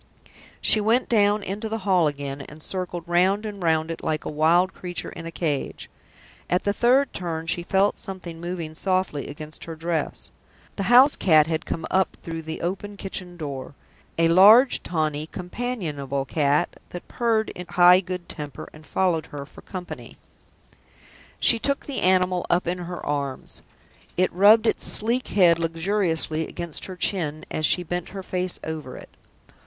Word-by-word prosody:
She 215 Hz, -, +5 dB
went 230 Hz, +4 st, +2 dB
down 205 Hz, -2 st, +3 dB
into 205 Hz, +4 st, -4 dB
the 225 Hz, -, -2 dB
hall 180 Hz, -5 st, +4 dB
again, 140 Hz, -1 st, -4 dB
and 150 Hz, +2 st, -10 dB
circled 180 Hz, -2 st, -4 dB
round 185 Hz, +5 st, +2 dB
and 205 Hz, -2 st, -6 dB
round 160 Hz, -1 st, +1 dB
it 165 Hz, -, -7 dB
like 155 Hz, -1 st, -2 dB
a -, -, -3 dB
wild 165 Hz, +5 st, +3 dB
creature 175 Hz, -1 st, -6 dB
in 165 Hz, -, -8 dB
a -, -, -6 dB
cage. 150 Hz, -5 st, -3 dB, 0.6 s
At 180 Hz, -, +1 dB
the 200 Hz, -, +1 dB
third 255 Hz, +5 st, +3 dB
turn, 165 Hz, -2 st, -4 dB
she 170 Hz, +1 st, 0 dB
felt 195 Hz, +3 st, +1 dB
something 180 Hz, -4 st, -7 dB
moving 170 Hz, -2 st, -5 dB
softly 185 Hz, -3 st, -1 dB
against 155 Hz, +1 st, -8 dB
her 165 Hz, -, -7 dB
dress. 165 Hz, -2 st, -3 dB, 0.4 s
The -, -, -3 dB
house 255 Hz, +4 st, +7 dB
cat 155 Hz, -4 st, +5 dB
had 160 Hz, 0 st, -3 dB
come 160 Hz, -, -3 dB
up 190 Hz, 0 st, +1 dB
through 165 Hz, -1 st, -5 dB
the 160 Hz, 0 st, -6 dB
open 195 Hz, +4 st, -4 dB
kitchen 185 Hz, -2 st, -6 dB
door 140 Hz, -3 st, -6 dB, 0.4 s
a 165 Hz, 0 st, +4 dB
large, 210 Hz, +10 st, +7 dB
tawny, 155 Hz, -3 st, -2 dB
companionable 170 Hz, -, -4 dB
cat 145 Hz, +2 st, 0 dB
that 175 Hz, -, -8 dB
purred 225 Hz, -3 st, 0 dB
in 180 Hz, 0 st, -8 dB
high 180 Hz, +1 st, +7 dB
good 180 Hz, -1 st, -6 dB
temper, 150 Hz, -3 st, -7 dB
and 155 Hz, -1 st, -15 dB
followed 175 Hz, -3 st, 0 dB
her 140 Hz, -1 st, -7 dB
for -, -, -15 dB
company. 180 Hz, -2 st, -8 dB, 1.2 s
She 230 Hz, -, +4 dB
took 280 Hz, +4 st, -1 dB
the 280 Hz, -, -3 dB
animal 180 Hz, -1 st, +3 dB
up 175 Hz, +1 st, +2 dB
in 180 Hz, +1 st, -2 dB
her 175 Hz, 0 st, -6 dB
arms 140 Hz, -2 st, -3 dB, 0.6 s
it 185 Hz, +1 st, +2 dB
rubbed 210 Hz, +5 st, +6 dB
its -, -, +1 dB
sleek 235 Hz, +4 st, 0 dB
head 175 Hz, -4 st, +4 dB
luxuriously 165 Hz, -2 st, 0 dB
against 170 Hz, -3 st, -5 dB
her 185 Hz, -, -7 dB
chin 160 Hz, -5 st, -1 dB
as 155 Hz, -1 st, +1 dB
she 180 Hz, -, +2 dB
bent 175 Hz, +1 st, -4 dB
her 195 Hz, 0 st, -7 dB
face 185 Hz, -1 st, -3 dB
over 155 Hz, -5 st, -6 dB
it. -, -, -12 dB
175 Hz, 170 wpm, -24 LUFS, 160-195 Hz, 1.2 s, house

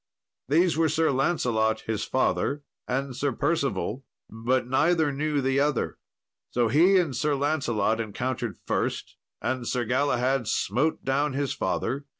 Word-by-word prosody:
These 165 Hz, +3 st, +3 dB
were 160 Hz, -1 st, +3 dB
Sir 160 Hz, 0 st, +2 dB
Lancelot, 120 Hz, -6 st, +1 dB
his 110 Hz, -2 st, -3 dB
father, 140 Hz, +2 st, 0 dB, 0.2 s
and 135 Hz, 0 st, -2 dB
Sir 140 Hz, +2 st, 0 dB
Percival, 135 Hz, -3 st, -1 dB, 0.3 s
but 120 Hz, +4 st, 0 dB
neither 155 Hz, +3 st, +2 dB
knew 145 Hz, +1 st, -1 dB
the 135 Hz, +1 st, +1 dB
other. 145 Hz, -2 st, 0 dB, 0.5 s
So 120 Hz, -2 st, +1 dB
he 175 Hz, -, +5 dB
and 165 Hz, -8 st, +1 dB
Sir 145 Hz, +4 st, +1 dB
Lancelot 120 Hz, -7 st, 0 dB
encountered 120 Hz, +4 st, -3 dB
first, -, -, -2 dB, 0.3 s
and 130 Hz, -2 st, -2 dB
Sir 125 Hz, -1 st, -1 dB
Galahad 130 Hz, 0 st, +1 dB
smote 135 Hz, +13 st, 0 dB
down 140 Hz, +1 st, +1 dB
his 140 Hz, 0 st, -1 dB
father. 140 Hz, +2 st, -2 dB
135 Hz, 140 wpm, -26 LUFS, 120-150 Hz, 0.5 s, he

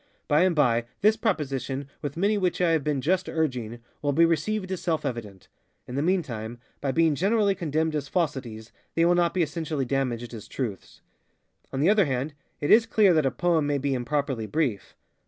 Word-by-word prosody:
By 150 Hz, +2 st, +4 dB
and 180 Hz, -3 st, +1 dB
by, 120 Hz, -6 st, +3 dB, 0.2 s
this 215 Hz, +2 st, +5 dB
proposition, 140 Hz, -, -2 dB
with 145 Hz, 0 st, -5 dB
many 200 Hz, +4 st, +2 dB
which 185 Hz, -3 st, 0 dB
I 175 Hz, -2 st, +3 dB
have 160 Hz, -3 st, +1 dB
been 145 Hz, -2 st, -1 dB
just 185 Hz, +6 st, 0 dB
urging, 125 Hz, -7 st, -2 dB, 0.2 s
will 145 Hz, -1 st, 0 dB
be 165 Hz, +4 st, +5 dB
received 185 Hz, +5 st, -1 dB
as 185 Hz, -, -3 dB
self 160 Hz, -4 st, -1 dB
evident. 110 Hz, -7 st, -5 dB, 0.4 s
In 125 Hz, -, -7 dB
the 140 Hz, -, 0 dB
meantime, 125 Hz, -, -1 dB, 0.2 s
by 140 Hz, -, -1 dB
being 165 Hz, +1 st, +3 dB
generally 200 Hz, +6 st, +2 dB
condemned 160 Hz, -3 st, -1 dB
as 145 Hz, -2 st, -2 dB
falsities, 130 Hz, -10 st, -3 dB, 0.2 s
they 165 Hz, -, +3 dB
will 175 Hz, -, +4 dB
not 175 Hz, 0 st, +2 dB
be 180 Hz, -, +3 dB
essentially 155 Hz, -2 st, -2 dB
damaged 120 Hz, -3 st, -2 dB
as 110 Hz, -3 st, -8 dB
truths. 110 Hz, -8 st, -6 dB, 0.7 s
On 135 Hz, -, -2 dB
the 165 Hz, -, +4 dB
other 210 Hz, -3 st, +4 dB
hand, 135 Hz, +2 st, -2 dB, 0.3 s
it 145 Hz, -, 0 dB
is 225 Hz, +1 st, +6 dB
clear 210 Hz, -5 st, +4 dB
that 155 Hz, -4 st, +3 dB
a -, -, +3 dB
poem 165 Hz, 0 st, +1 dB
may 145 Hz, -1 st, +1 dB
be 140 Hz, 0 st, -1 dB
improperly 130 Hz, -2 st, -2 dB
brief. 130 Hz, -8 st, -2 dB
150 Hz, 195 wpm, -26 LUFS, 130-175 Hz, 0.7 s, is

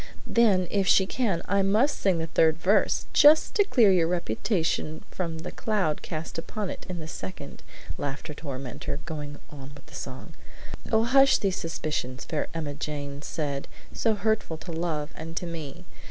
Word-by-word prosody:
"Then, 200 Hz, -6 st, +3 dB
if 195 Hz, -2 st, +1 dB
she 190 Hz, -, +6 dB
can, 195 Hz, -6 st, 0 dB
I 200 Hz, +1 st, +3 dB
must 215 Hz, +9 st, +2 dB
sing 190 Hz, -3 st, +2 dB
the 165 Hz, -, -1 dB
third 160 Hz, 0 st, +3 dB
verse, 195 Hz, +5 st, +2 dB
just 300 Hz, +2 st, +6 dB
to 410 Hz, -, +5 dB
clear 235 Hz, -, +5 dB
your 175 Hz, -3 st, +4 dB
reputation 165 Hz, -, -1 dB
from 165 Hz, -3 st, -3 dB
the 160 Hz, -, -6 dB
cloud 195 Hz, -9 st, 0 dB
cast 160 Hz, 0 st, -5 dB
upon 205 Hz, +4 st, -4 dB
it -, -, -9 dB
in 180 Hz, -, -3 dB
the 155 Hz, -, -6 dB
second," 95 Hz, -11 st, -7 dB, 0.4 s
laughed 140 Hz, -1 st, -4 dB
her 150 Hz, -, -5 dB
tormentor, 135 Hz, -2 st, -5 dB
going 150 Hz, -3 st, -5 dB
on 140 Hz, -1 st, -10 dB
with -, -, -15 dB
the -, -, -18 dB
song: -, -, -7 dB, 0.6 s
"'Oh, 220 Hz, 0 st, +4 dB
hush 270 Hz, +3 st, +6 dB
these 195 Hz, -2 st, 0 dB
suspicions!' 150 Hz, -6 st, -3 dB
Fair 155 Hz, -, -2 dB
Emmajane 145 Hz, -2 st, -4 dB
said, 145 Hz, -2 st, -3 dB, 0.3 s
'So 225 Hz, -2 st, +1 dB
hurtful 210 Hz, -5 st, 0 dB
to 170 Hz, +2 st, -8 dB
love 160 Hz, -2 st, -2 dB
and 165 Hz, +1 st, -8 dB
to -, -, -1 dB
me! 165 Hz, 0 st, -7 dB
165 Hz, 170 wpm, -27 LUFS, 150-200 Hz, 0.6 s, she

